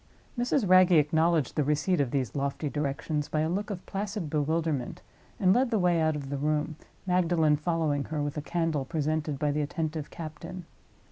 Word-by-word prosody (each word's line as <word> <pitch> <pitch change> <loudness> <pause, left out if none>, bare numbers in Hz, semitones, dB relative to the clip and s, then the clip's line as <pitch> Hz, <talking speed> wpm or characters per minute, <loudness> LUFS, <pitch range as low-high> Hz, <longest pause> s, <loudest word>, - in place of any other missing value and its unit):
Mrs. 245 -2 +1
Wragge 185 0 +6
acknowledged 160 0 +2
the 150 - +2
receipt 150 +4 +1
of 135 - 0
these 130 -5 -2
lofty 140 +2 -2
directions 150 +1 -2
by 155 - 0
a 160 - 0
look 200 +5 -2
of 190 -4 -6
placid 200 -5 -4
bewilderment, 155 -3 -1 0.4
and 185 -1 +5
led 255 +2 +2
the 225 - +1
way 175 -3 +2
out 155 -1 +2
of 140 -2 -6
the 140 - -1
room; 150 +1 0 0.3
Magdalen 175 -4 +3
following 155 -3 0
her, 155 -1 -4
with 145 -1 -2
a 150 - -2
candle 165 -2 -1
presented 155 0 -1
by 145 0 0
the 150 +1 0
attentive 155 0 -3
captain. 170 +2 -8
155 Hz, 185 wpm, -28 LUFS, 150-175 Hz, 0.4 s, Wragge